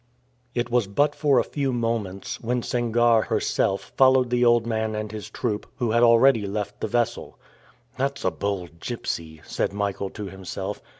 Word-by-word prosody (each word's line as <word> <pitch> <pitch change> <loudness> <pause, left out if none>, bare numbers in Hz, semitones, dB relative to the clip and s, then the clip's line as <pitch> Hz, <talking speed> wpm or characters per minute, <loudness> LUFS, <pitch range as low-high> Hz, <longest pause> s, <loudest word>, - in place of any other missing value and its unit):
It 120 0 -1
was 120 -4 +2
but 145 +9 +2
for 145 -3 +2
a - - +4
few 140 -2 -2
moments, 115 -5 -2
when 120 +1 -1
Sangarre 120 -1 +3
herself 95 - 0
followed 130 -2 +5
the 125 0 +2
old 120 -1 +4
man 110 -1 -1
and 105 -1 -4
his 110 -1 -7
troop, 110 -4 -3
who 120 -3 -1
had 115 +1 +3
already 115 -2 +5
left 105 +1 -4
the - - 0
vessel. 120 -1 -1 0.6
"That's 140 +1 -1
a 95 - +3
bold 90 -1 -4
gypsy," 80 -8 -5
said - - -2
Michael 100 -1 -2
to 105 +1 -7
himself. 95 +1 -6
115 Hz, 170 wpm, -24 LUFS, 100-120 Hz, 0.6 s, followed